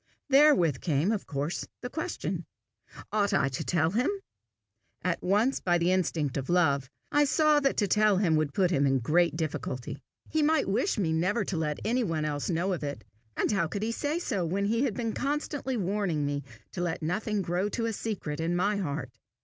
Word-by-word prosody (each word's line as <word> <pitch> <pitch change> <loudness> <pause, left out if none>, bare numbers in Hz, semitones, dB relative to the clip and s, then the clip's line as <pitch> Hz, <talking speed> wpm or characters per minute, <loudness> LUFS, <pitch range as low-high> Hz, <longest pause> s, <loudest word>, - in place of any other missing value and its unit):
Therewith 270 - +5
came, 160 +4 +1
of 215 -3 -2
course, 145 +4 -3
the 245 - -4
question 320 +3 -4 0.6
Ought 205 -1 +2
I 140 -7 +2
to 130 - -4
tell 165 -2 +1
him? 240 +7 +1 0.9
At - - -1
once, 210 +8 +2
by 175 -1 +2
the 170 +1 +2
instinct 160 -7 0
of 135 +2 -4
love, 140 -7 +2 0.2
I 295 0 +4
saw 300 +1 +4
that 275 -1 +1
to 205 - +2
tell 210 -1 +4
him 180 -5 +3
would 155 -2 +1
put 185 -2 +3
him 140 -4 +3
in 135 - +3
a - - +2
great 165 +7 +2
difficulty. 145 -5 -4 0.3
He 315 - 0
might 310 +1 +3
wish 215 - +1
me 170 -6 +1
never 185 +6 +1
to 190 - -3
let 150 -2 -1
any 245 +3 +1
one 160 -6 -1
else 145 -1 -2
know 180 +3 0
of 170 - -4
it, 145 -1 -4 0.3
and - - +1
how 190 -5 +1
could 200 +6 -4
he 225 - 0
say 290 +6 -1
so 230 - -1
when 190 +4 -1
he 230 +6 +1
had 230 -7 -2
been 230 -1 -2
constantly 280 -2 -2
warning 190 -6 0
me 145 0 -1 0.3
to 175 - -4
let 175 -2 -2
nothing 205 +5 -1
grow 180 +4 -1
to 230 +2 -2
a 225 - -1
secret 195 -9 -4
in 165 +2 0
my 200 +4 +1
heart? 145 -8 -3
185 Hz, 205 wpm, -28 LUFS, 160-225 Hz, 0.9 s, Therewith